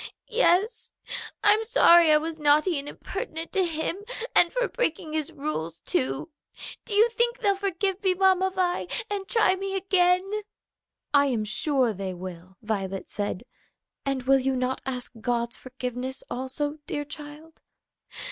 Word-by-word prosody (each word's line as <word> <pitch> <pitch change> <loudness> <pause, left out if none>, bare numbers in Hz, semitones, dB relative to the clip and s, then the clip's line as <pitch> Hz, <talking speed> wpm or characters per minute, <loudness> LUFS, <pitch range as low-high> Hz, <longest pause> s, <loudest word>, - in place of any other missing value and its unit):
"Yes; 440 0 +2 0.5
I'm 425 +1 +5
sorry 345 -9 +6
I 305 - +7
was 320 +1 -4
naughty 300 +2 +3
and 285 +1 -6
impertinent 325 -8 -6
to 385 - +2
him, 335 +3 -2 0.3
and 345 - +5
for - - 0
breaking 320 -9 -2
his 310 -2 -2
rules, 170 - -4
too. 135 - -1 0.5
Do 415 - -4
you 435 +3 +6
think 475 +1 +1
they'll 410 -5 +2
forgive 390 0 -1
me, 375 -2 +3
Mamma 380 0 +4
Vi, 365 -2 -1 0.2
and 395 -2 -3
try 440 -5 +3
me 390 +1 -4
again?" 365 -1 +3 0.9
"I 285 0 +5
am 235 -5 0
sure 245 +3 +1
they 190 -1 -4
will," 185 +1 -9
Violet 195 -3 -3
said. 205 0 -3 0.6
"And 270 -2 -1
will 270 +1 +5
you 265 0 0
not 255 +1 -1
ask 250 -2 -4
God's 235 -1 -1
forgiveness, 255 0 -5
also, 280 +4 -3
dear 290 0 -3
child?" 300 +2 -10
310 Hz, 145 wpm, -26 LUFS, 255-380 Hz, 0.9 s, I